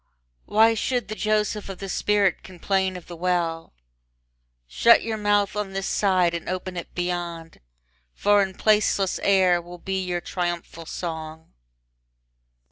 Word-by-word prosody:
Why 225 +2 +4
should 240 0 -1
the - - -3
Joseph 215 -1 -1
of 195 - -6
the 195 - -6
spirit 200 0 +1
complain 190 +1 -1
of 180 - -11
the 175 - -9
well? 170 -2 -1 0.9
Shut - - +5
your 225 -1 -2
mouth 205 -1 +1
on 205 -2 -3
this 195 0 -3
side 185 -4 +2
and 170 - -4
open 185 0 -4
it 175 - -7
beyond, 175 -2 -4 0.6
For 205 0 +4
in 190 -1 -2
placeless 210 -3 +2
air 185 -3 +3
will 175 +1 -11
be 190 +1 -3
your 180 -1 -2
triumphal 175 -2 -4
song. 160 -2 -6
185 Hz, 140 wpm, -24 LUFS, 175-205 Hz, 0.9 s, Shut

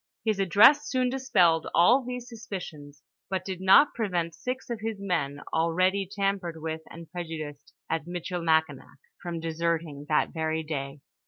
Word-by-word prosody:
Ilis 215 -3 +1
address 210 - +6
soon 255 -1 +1
dispelled 185 -12 +2
all 240 +10 +5
these 250 0 -6
suspicions, 175 -11 -8 0.3
but 185 -1 -2
did 185 -2 -5
not 195 +10 +6
prevent 180 -7 -1
six 255 +6 -5
of 235 - -3
his 220 -1 -4
men, 150 -8 -2
already 185 +4 +1
tam 200 0 0
pered 170 -3 -7
with 160 0 -4
and 165 -1 -11
prejudiced 155 -4 -7 0.2
at 160 0 -2
Michilimakinak, 170 -2 -1 0.2
from 175 -2 -4
deserting 165 -2 -2
that 150 - +2
very 160 -1 -1
day. 140 -2 -5
175 Hz, 150 wpm, -27 LUFS, 160-200 Hz, 0.3 s, address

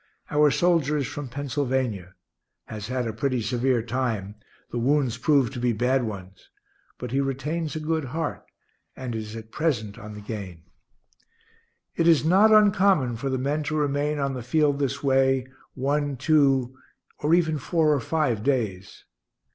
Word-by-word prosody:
Our 150 0 +5
soldier 160 -2 +2
is 140 - -1
from 145 +2 -6
Pennsylvania; 130 -8 -2 0.5
has 105 -2 -7
had 125 0 -2
a 110 - -3
pretty 130 +3 -1
severe 120 +1 0
time; 115 -5 -2 0.4
the 120 - -2
wounds 130 -2 +1
proved 135 -2 +2
to 125 - -5
be 120 -1 +1
bad 125 +3 +1
ones. 95 -3 -8 0.5
But 125 -2 -6
he 135 +2 +1
retains 150 +4 -3
a - - -2
good 160 -1 -1
heart, 155 +4 -4 0.5
and 130 -2 -5
is 110 -1 -5
at 110 0 -9
present 120 -11 -2
on 105 0 -9
the 105 - -9
gain. 100 -6 -7 1.3
It 165 - +2
is 160 -3 +5
not 195 +6 +5
uncommon 195 - +4
for 135 +4 -3
the 130 - -1
men 140 +4 -1
to 155 +1 -2
remain 145 0 0
on 140 -1 -1
the 125 - -5
field 145 +3 +1
this 140 0 -2
way, 135 -1 +2 0.3
one, 145 +1 -1
two, 135 -3 +2 0.4
or 155 +3 +3
even 160 -3 +1
four 155 +2 +2
or 145 - +1
five 125 -5 0
days. 110 -8 -2
135 Hz, 165 wpm, -25 LUFS, 120-150 Hz, 1.3 s, Our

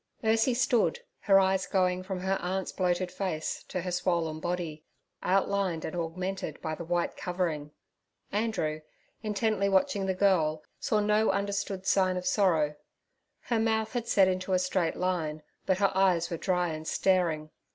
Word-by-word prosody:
Ursie 225 +3 +3
stood, 250 - +2 0.2
her 195 -2 +5
eyes 190 0 +2
going 185 -1 +1
from 185 -1 -5
her 190 +1 0
aunt's 190 +1 -2
bloated 180 -1 0
face 185 -4 -3
to 185 - -3
her 180 +1 -4
swollen 170 -3 0
body, 170 -3 -3 0.4
outlined 195 -3 +1
and 160 - -5
augmented 175 0 -3
by 160 - -3
the 165 - -5
white 175 +1 -1
covering. 170 -5 -2 0.6
Andrew, 205 -8 -1 0.4
intently 215 -1 0
watching 195 0 +2
the 190 - 0
girl, 160 -6 +2 0.2
saw 215 - +1
no 210 +1 +3
understood 200 -1 -1
sign 185 -1 +3
of 180 - -4
sorrow. 170 -7 +2 0.7
Her 235 -2 0
mouth 220 0 0
had 240 -2 -2
set 195 -4 +5
into 185 0 -1
a - - +5
straight 180 -2 0
line, 160 -4 -2 0.2
but 190 -2 +3
her 195 -1 +2
eyes 180 -3 +3
were 170 - -2
dry 180 0 0
and 155 0 -5
staring. 165 -5 +1
185 Hz, 160 wpm, -29 LUFS, 170-200 Hz, 0.7 s, her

